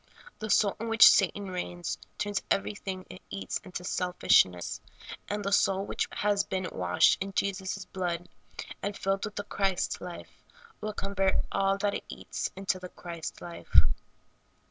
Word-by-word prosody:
The 215 - -4
soul 200 -1 +4
in 230 +1 -3
which 225 -1 +9
Satan 195 0 +4
reigns 175 -1 -3 0.2
turns 205 -1 -1
everything 195 -2 -1
it 185 - -11
eats 95 -1 -3
into 185 -3 -7
selfishness, 175 - +2 0.5
and 205 0 -2
the 200 - 0
soul 195 -1 +3
which - - -1
has 205 -1 +1
been 185 -1 -2
washed 90 -1 +3
in 195 0 -3
Jesus' 195 0 -1
blood 175 -2 -3 0.5
and 200 0 -3
filled 195 +1 0
with 210 - -7
the 205 - -3
Christ 195 -2 -1
life 180 -1 -9 0.4
will 215 0 -3
convert 195 -1 0 0.2
all 195 0 +2
that 200 0 0
it - - -4
eats - - -4
into 190 -1 -1
the 180 0 -8
Christ 170 -3 -7
life. 170 -1 -2
195 Hz, 155 wpm, -29 LUFS, 180-200 Hz, 0.5 s, which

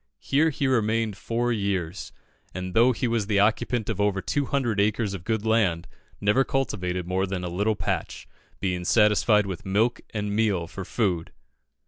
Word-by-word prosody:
Here 150 +4 +2
he 140 -1 -2
remained 115 -4 +1
four 120 +4 -1
years, 100 -4 -2 0.4
and 90 0 -4
though 120 +3 +5
he 125 +1 -1
was 115 -3 0
the 105 -2 +2
occupant 110 +2 +1
of 105 -3 -2
over 100 -1 +1
200 135 -3 -1
acres 105 0 +1
of 95 -3 -6
good 110 +1 -1
land, 105 -7 +1 0.3
never 105 +6 +3
cultivated 90 -10 -2
more 95 +2 0
than 95 -1 -3
a 90 - -3
little 100 +5 0
patch, 85 -4 -3 0.3
"being 90 -2 -2
satisfied 105 +1 +4
with 95 -4 -5
milk 105 +5 +1
and 105 -1 -3
meal 105 -6 +1
for 95 +3 -7
food." 90 -8 -1
105 Hz, 165 wpm, -25 LUFS, 95-115 Hz, 0.4 s, though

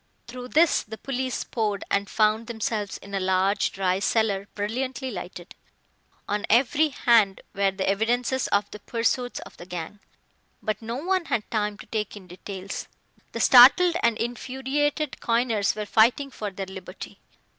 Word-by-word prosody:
Through 250 +1 -8
this 320 +5 +4
the 220 +1 -9
police 260 0 -3
poured, 210 -4 -2
and 200 0 +1
found 215 +1 +2
themselves 220 -3 -3
in 200 - -13
a 195 - 0
large, 190 +2 +1
dry 190 -1 0
cellar, 205 -2 +1
brilliantly 255 +5 -3
lighted. 180 -2 -8 0.7
On 205 0 -1
every 275 +6 +4
hand 230 -7 +3
were 200 -1 +2
the 190 0 -3
evidences 240 +5 +1
of 200 0 +1
the 210 - -8
pursuits 245 +2 -1
of - - -13
the 175 - -10
gang. 180 +3 -6 0.6
But 215 0 -3
no 230 +1 -4
one 360 +6 0
had 230 -8 -2
time 210 -2 -1
to - - -11
take 210 -2 -3
in 195 - -12
details. 190 +2 -7 0.5
The - - -4
startled 290 +8 +7
and 235 -2 +2
infuriated 265 +5 -2
coiners 230 -4 +1
were 210 -1 -4
fighting 235 +7 +3
for 210 -4 -5
their 195 0 -6
liberty. 190 0 -10
220 Hz, 155 wpm, -25 LUFS, 200-250 Hz, 0.7 s, startled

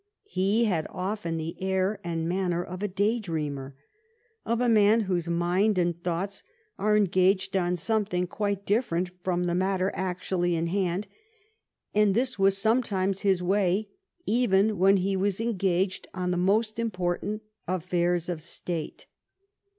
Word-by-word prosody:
He 215 - +1
had 175 -7 0
often 185 -3 -3
the 160 +1 -4
air 190 +2 0
and 165 -1 -2
manner 175 -1 0
of 185 +1 -7
a 210 - 0
noon 185 - -13
day 215 +4 +2
dreamer; 145 -8 -4 0.7
of 235 0 +1
a 250 - +2
man 220 0 +5
whose 180 -4 -1
mind 180 +5 +2
and 175 -1 0
thoughts 180 +3 -2 0.4
are 210 +1 +3
engaged 190 0 +2
on 180 -1 +1
something 195 -1 0
quite 200 +1 -2
different 185 -5 0
from 180 -1 0
the 175 -1 0
matter 190 +1 +1
actually 180 -1 -1
in 165 0 0
hand; 185 +2 -1 0.9
and 210 -2 +3
this 250 -2 0
was 195 0 +4
sometimes 200 -3 +1
his 190 -3 +2
way 195 +2 +1 0.4
even 215 -3 +2
when 195 +2 +5
he 195 +1 0
was 195 +1 0
engaged 190 -4 0
on 180 -1 -1
the - - 0
most 215 +5 +1
im 230 0 0
portant 185 +3 -2 0.2
affairs 175 -1 0
of 175 -3 -3
state. 170 0 -5
190 Hz, 150 wpm, -27 LUFS, 175-205 Hz, 0.9 s, man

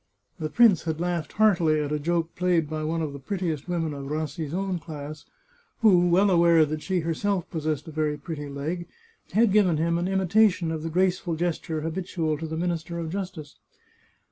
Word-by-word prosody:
The 155 -1 -2
prince 210 -5 +5
had 160 -1 -2
laughed 175 -2 -2
heartily 175 -8 +3
at 150 -1 -2
a 150 - 0
joke 165 +2 -1
played 175 -3 +1
by 155 0 -4
one 165 +1 -1
of 150 -2 -4
the 140 - -7
prettiest 165 -1 -3
women 165 -3 -1
of 140 -1 -6
Rassi's 155 0 -3
own 190 0 -2
class, 150 -2 -8 0.6
who, 180 -5 +5
well 190 +3 +4
aware 170 -2 +5
that 155 +1 -4
she 185 0 -1
her 165 +1 -1
self 195 +1 -1
possessed 155 -2 -2
a - - -7
very 150 -1 -1
pretty 145 -1 -6
leg, 155 +5 -4 0.5
had 220 0 +4
given 190 -6 +4
him 170 +2 +1
an 175 - -1
imitation: 190 -2 +2
of 160 -1 -3
the 165 - -3
graceful 180 0 +1
gesture 160 -1 -2
habitual 165 -2 -2
to 160 - -4
the 160 0 -4
Minister 170 0 -2
of 165 -1 -4
Justice. 180 -6 -6
165 Hz, 195 wpm, -26 LUFS, 155-180 Hz, 0.6 s, prince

